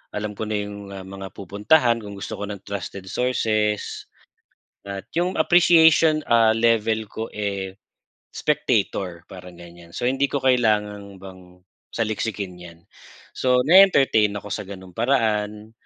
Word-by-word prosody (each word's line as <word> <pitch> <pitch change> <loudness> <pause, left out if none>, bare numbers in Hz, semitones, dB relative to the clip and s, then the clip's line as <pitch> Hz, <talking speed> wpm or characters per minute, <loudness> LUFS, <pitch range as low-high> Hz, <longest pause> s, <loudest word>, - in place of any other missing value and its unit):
alam 105 0 -3
ko 110 - -4
na 110 - -2
yung 100 -1 -5 0.2
mga 95 0 -8
pupuntahan 115 - +2
kung 100 -2 -9
gusto 100 - -7
ko 100 - -4
ng 100 -2 -7
trusted 100 -1 -6
sources, 110 -4 -1 0.8
at 100 -1 -7
yung 180 +2 0
appreciation 160 -3 +5
ah, 115 -1 +4
level 115 -1 +2
ko 110 +2 -6
eh, 100 -2 -4 0.6
spectator, 100 - -1
parang 90 -2 -11
ganyan. 85 -1 -14
So, - - -4
hindi 135 +2 +1
ko 140 - -2
kailangan 105 -5 +1
bang 90 -1 -14 0.3
saliksikin 105 -5 -3
'yan. 85 -1 -12 0.5
So, 125 -1 +2
nae-entertain 140 - +5
ako 105 - -7
sa 100 - -4
gano'ng 95 -2 -10
paraan, 110 -3 0
105 Hz, 130 wpm, -23 LUFS, 100-120 Hz, 0.8 s, appreciation